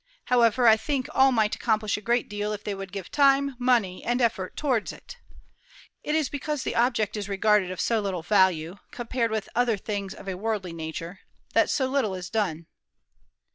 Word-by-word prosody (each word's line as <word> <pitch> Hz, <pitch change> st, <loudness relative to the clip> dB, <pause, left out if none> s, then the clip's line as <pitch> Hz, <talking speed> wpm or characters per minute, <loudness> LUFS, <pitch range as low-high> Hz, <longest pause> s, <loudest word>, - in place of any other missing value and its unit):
However, 240 Hz, 0 st, +4 dB
I 220 Hz, -1 st, +7 dB
think 270 Hz, +2 st, -2 dB
all 265 Hz, 0 st, +5 dB
might 220 Hz, -3 st, +1 dB
accomplish 215 Hz, -2 st, 0 dB
a 210 Hz, -, -5 dB
great 235 Hz, +3 st, +1 dB
deal 210 Hz, 0 st, -3 dB
if 210 Hz, 0 st, -7 dB
they 205 Hz, -, -3 dB
would 195 Hz, -1 st, -7 dB
give 195 Hz, -3 st, -7 dB
time, 280 Hz, -1 st, +3 dB
money, 235 Hz, -7 st, +1 dB
and 240 Hz, +2 st, 0 dB
effort 220 Hz, -6 st, -1 dB
towards 255 Hz, -8 st, 0 dB
it. -, -, -12 dB, 0.8 s
It 300 Hz, -, -1 dB
is 310 Hz, -3 st, +2 dB
because 290 Hz, 0 st, -3 dB
the -, -, -3 dB
object 230 Hz, -4 st, +1 dB
is 205 Hz, -1 st, -4 dB
regarded 200 Hz, -1 st, +2 dB
of 185 Hz, -, -6 dB
so 230 Hz, -2 st, +1 dB
little 190 Hz, -5 st, -3 dB
value, 185 Hz, -3 st, +2 dB
compared 240 Hz, -1 st, -2 dB
with 220 Hz, -1 st, -2 dB
other 240 Hz, -3 st, +2 dB
things 200 Hz, 0 st, -4 dB
of 195 Hz, -, -12 dB
a 190 Hz, -, -2 dB
worldly 200 Hz, -3 st, -3 dB
nature, 165 Hz, +3 st, -6 dB, 0.3 s
that -, -, +3 dB
so 265 Hz, -, +1 dB
little 260 Hz, -7 st, 0 dB
is 180 Hz, -1 st, -7 dB
done." 175 Hz, -7 st, -1 dB
215 Hz, 190 wpm, -26 LUFS, 195-245 Hz, 0.8 s, I